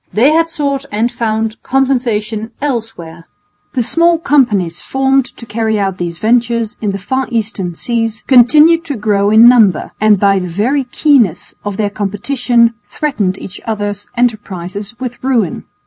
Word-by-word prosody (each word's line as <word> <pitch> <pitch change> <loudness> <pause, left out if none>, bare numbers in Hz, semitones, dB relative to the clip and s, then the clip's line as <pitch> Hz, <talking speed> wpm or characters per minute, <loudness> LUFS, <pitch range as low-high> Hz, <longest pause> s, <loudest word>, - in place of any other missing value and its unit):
They 250 +7 +3
had 330 +1 +2
sought 280 -4 -2
and 225 +3 0
found 220 -1 -2
compensation 235 -5 -1
elsewhere. 225 - -5 0.5
The 250 - +1
small 335 +7 +2
companies 215 - +1
formed 270 0 +1
to 235 - -10
carry 220 -1 -1
out 195 -2 -2
these 170 -1 -4
ventures 235 +1 0
in 210 - -1
the 195 - -4
far 260 +7 -2
Eastern 205 -6 -3
seas 225 0 -2
continued 300 +7 +5
to 290 -4 -3
grow 205 -2 +1
in 220 +2 +7
number, 220 -8 +4
and 215 -2 +4
by 195 -1 +3
the 180 - -4
very 240 +11 -1
keenness 250 - +1
of 205 -2 -4
their 205 -2 -1
competition 235 +4 0
threatened 205 -4 -2
each 185 - -9
other's 205 -2 -3
enterprises 205 -3 -3
with 250 -1 -6
ruin. 235 - -1
225 Hz, 150 wpm, -14 LUFS, 205-260 Hz, 0.5 s, in